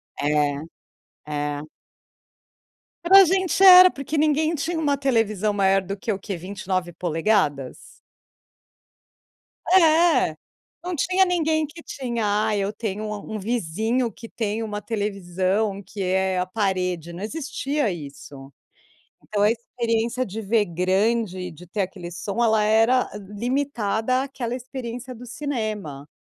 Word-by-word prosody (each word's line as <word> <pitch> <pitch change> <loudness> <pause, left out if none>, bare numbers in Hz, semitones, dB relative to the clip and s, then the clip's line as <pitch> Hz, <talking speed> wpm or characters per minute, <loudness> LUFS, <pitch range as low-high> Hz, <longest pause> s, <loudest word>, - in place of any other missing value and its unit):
É, 145 0 +1 0.7
é. 145 -1 -3 1.4
Para 380 +3 +8
a - - +6
gente, 375 +1 +1
era 370 -1 +10
porque 280 +3 -4
ninguém 310 +1 +2
tinha 325 +3 -2
uma 290 -3 +1
televisão 220 -6 +1
maior 195 -1 +3
do 195 +2 -6
que 230 +3 -3
o 195 - -3
quê? 200 0 -5
29'? 175 -4 -1 1.9
É, 340 -2 +4 0.5
não 360 0 -3
tinha 370 +6 +2
ninguém 320 -3 +1
que 320 +3 -12
tinha: 220 -5 -1
"Ah, 215 - +1
eu 200 0 -1
tenho 215 -1 -4
um 210 - -3
a 210 - -5
um 215 +1 -6
vizinho 225 +3 -1
que 230 +3 -12
tem 220 0 -3
uma 210 -1 -4
televisão 200 -1 -1
que 195 +2 -8
é 190 0 +1
a 180 - 0
parede", 185 -4 -2
não 175 +4 -7
existia 285 -1 -2
isso. 140 -3 -10 0.7
Então, 205 -1 -1
a 210 - +5
experiência 235 +1 -2
de 215 +2 -6
ver 215 +1 +2
grande, 185 +1 0
de 170 +3 -14
ter 200 +4 -2
aquele 180 -2 -5
som, 195 +6 -2
ela 220 -2 +3
era 225 +4 +3
limitada 235 +2 -1
àquela 255 -3 -4
experiência 250 -1 -7
do 245 +1 -11
cinema. 215 - -4
215 Hz, 135 wpm, -23 LUFS, 190-255 Hz, 1.9 s, era